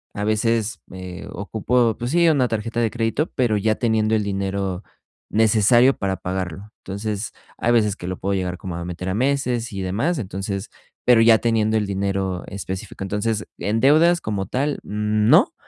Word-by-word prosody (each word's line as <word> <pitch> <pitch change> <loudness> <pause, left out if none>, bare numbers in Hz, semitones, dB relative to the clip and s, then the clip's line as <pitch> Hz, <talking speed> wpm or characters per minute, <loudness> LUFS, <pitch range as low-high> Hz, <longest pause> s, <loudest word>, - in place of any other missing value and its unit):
A 105 - -3
veces 110 +1 0
me 90 -1 -8
ocupo, 110 +3 0
pues 120 +2 -4
sí, 170 +2 +4
una 140 -6 +3
tarjeta 115 +1 -3
de 115 -1 +2
crédito, 115 +7 -1
pero 120 -5 +2
ya 110 +1 +1
teniendo 110 -2 +1
el 105 - +1
dinero 100 -1 -2 0.5
necesario 110 +4 +4
para 95 -1 -1
pagarlo. 95 +2 -5
Entonces, 105 +2 -4 0.2
hay 120 - +1
veces 105 -4 +3
que 90 - -8
lo 90 0 -3
puedo 100 +1 -2
llegar 90 -2 -2
como 90 -2 -6
a 85 - -4
meter 90 +1 -5
a - - -1
meses 125 0 0
y 95 -1 -3
demás. 115 - 0
Entonces, 100 -2 -4 0.3
pero 120 -2 +6
ya 115 -1 +7
teniendo 110 -1 +1
el 105 - 0
dinero 95 -2 -2
específico. 95 0 -6
Entonces, 105 +2 -1
en 110 +2 0
deudas 160 +6 +5
como 100 -3 -3
tal, 140 +3 -1
no. 105 +1 +3
105 Hz, 170 wpm, -22 LUFS, 95-115 Hz, 0.5 s, ya